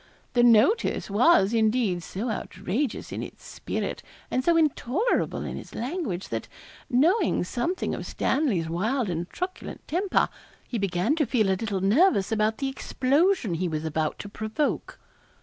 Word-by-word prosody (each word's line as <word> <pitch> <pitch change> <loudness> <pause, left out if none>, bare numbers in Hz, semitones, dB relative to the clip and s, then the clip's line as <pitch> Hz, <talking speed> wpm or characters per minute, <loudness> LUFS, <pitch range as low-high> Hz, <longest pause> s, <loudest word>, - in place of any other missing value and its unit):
The 245 - +4
'notice' 240 - +4
was, 220 - +4
indeed, 220 -5 +2
so 215 +8 -4
outrageous 215 +5 -3
in - - -4
its - - -9
spirit, - - -4 0.3
and 255 - +1
so 340 +2 +4
intolerable 320 - +1
in - - -5
its - - -12
language, 240 - -3
that, - - -3 0.4
knowing 325 - +3
something 255 - -2
of - - -5
Stanley's 245 - 0
wild 210 +6 -1
and 170 +1 -3
truculent 365 +1 -6
temper, 370 +4 +1 0.4
he 235 - -3
began 195 - +1
to 300 -5 +1
feel 220 -4 +2
a - - +4
little 200 -1 -2
nervous 205 - +3
about 220 0 +1
the 275 - -2
explosion 270 - +1
he 180 +2 -1
was 155 -1 -3
about 155 -1 -1
to - - -7
provoke. 220 +8 -2
230 Hz, 150 wpm, -26 LUFS, 195-295 Hz, 0.4 s, The